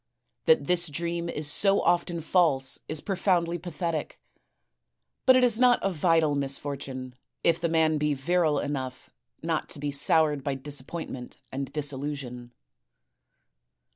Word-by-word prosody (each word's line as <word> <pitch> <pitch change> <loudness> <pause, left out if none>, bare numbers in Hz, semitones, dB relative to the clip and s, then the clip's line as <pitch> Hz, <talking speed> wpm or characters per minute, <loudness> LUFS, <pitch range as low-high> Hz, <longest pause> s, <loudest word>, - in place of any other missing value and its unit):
That 475 - +4
this 175 -1 +2
dream 170 +3 -3
is 150 -2 -2
so 195 +6 +3
often 175 -1 +1
false 155 -6 +2
is 155 -1 0
profoundly 175 -3 0
pathetic; 165 -2 -4 1.1
but 260 - +8
it 255 - +4
is 235 -2 +3
not 250 -1 +6
a 195 - +1
vital 165 -2 +2
misfortune 135 -2 -4 0.3
if 170 0 +2
the 170 - +1
man 160 -1 +2
be 150 -1 +1
virile 155 +2 +1
enough 130 -3 -4 0.3
not 165 -1 -1
to - - -6
be 145 0 -2
soured 150 0 +2
by 140 -1 -1
disappointment 135 -1 -5
and 135 0 -4
disillusion. 135 -4 -4
155 Hz, 135 wpm, -27 LUFS, 140-170 Hz, 1.1 s, but